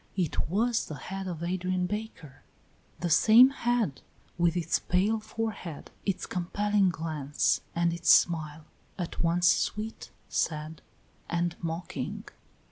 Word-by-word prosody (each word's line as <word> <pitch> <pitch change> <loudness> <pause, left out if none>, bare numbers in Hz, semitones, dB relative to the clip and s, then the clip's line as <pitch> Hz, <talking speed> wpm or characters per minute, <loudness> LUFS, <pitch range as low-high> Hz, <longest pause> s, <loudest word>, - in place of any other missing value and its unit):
It 170 -4 -1
was 230 +6 +1
the 155 - -6
head 190 +7 -6
of 170 -2 -5
Adrian 185 +1 -1
Baker, 180 -9 -6 0.6
the 175 - -1
same 235 - +7
head, 240 - 0 0.3
with 175 0 +2
its 170 -1 +1
pale 200 +5 +1
forehead, 215 -7 -5 0.2
its 195 -2 -1
compelling 200 +2 +1
glance, 155 -4 0
and 170 0 +2
its 170 0 -2
smile, 155 -2 +4 0.3
at 175 -3 -4
once 175 +1 +3
sweet, 215 +5 0 0.2
sad, 155 0 -2 0.5
and 170 0 0
mocking. 165 +1 -4
175 Hz, 125 wpm, -29 LUFS, 165-205 Hz, 0.6 s, same